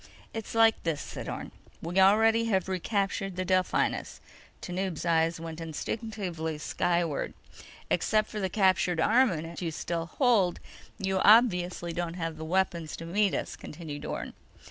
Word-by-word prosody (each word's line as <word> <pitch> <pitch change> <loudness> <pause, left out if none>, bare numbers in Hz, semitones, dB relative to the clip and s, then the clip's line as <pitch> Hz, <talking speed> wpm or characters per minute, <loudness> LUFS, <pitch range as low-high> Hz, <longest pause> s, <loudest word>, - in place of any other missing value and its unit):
_ - - -23 0.3
"It's 225 0 -6
like 225 -1 +5
this," 165 -4 -1
said - - -6
Orne. - - -6 0.3
"We 175 +3 -1
already 220 +4 +5
have 190 -5 +1
recaptured 195 0 -1
the 185 0 -2
Delphinus." 185 0 0 0.4
Tanub's 180 -2 -3
eyes 165 0 +2
went 165 0 -7
instinctively 165 -1 -4
skyward. 170 0 -1 0.6
"Except 215 0 +2
for 210 - -5
the 190 -2 -1
captured 185 -3 +2
armament 170 -6 +2
you 170 - -1
still 165 +1 -3
hold, 205 - +2 0.4
you 190 -2 -1
obviously 180 -6 +4
don't 170 0 -3
have 165 -2 -4
the 160 - -6
weapons 170 -2 0
to 165 - -8
meet 200 +3 +1
us," - - -3
continued 150 -2 -8
Orne. - - -5
180 Hz, 145 wpm, -29 LUFS, 165-205 Hz, 0.6 s, like